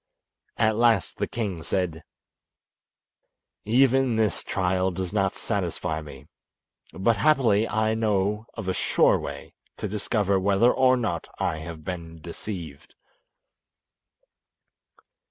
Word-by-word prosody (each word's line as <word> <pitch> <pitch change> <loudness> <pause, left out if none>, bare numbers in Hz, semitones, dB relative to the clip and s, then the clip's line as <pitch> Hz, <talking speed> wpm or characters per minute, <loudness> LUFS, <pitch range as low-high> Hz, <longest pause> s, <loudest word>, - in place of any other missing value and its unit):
At 110 -1 +2
last 115 -6 +2
the - - -1
king 100 -8 -3
said: 85 -3 -2 1.6
"Even 130 +2 +3
this 110 -2 0
trial 95 0 0
does 95 +1 -4
not 95 -3 +1
satisfy 90 -5 -2
me; 70 -3 -11 0.7
but 105 +4 +1
happily 115 -5 +3
I 110 0 +1
know 105 0 0
of 95 - -6
a 95 - +1
sure - - +3
way - - -7 0.2
to - - -3
discover 100 -1 0
whether 100 +5 +4
or 130 -1 +4
not 115 -3 -2
I 80 - -1
have 80 0 -8
been 85 -2 -6
deceived." 85 -3 -8
100 Hz, 115 wpm, -25 LUFS, 90-110 Hz, 1.6 s, whether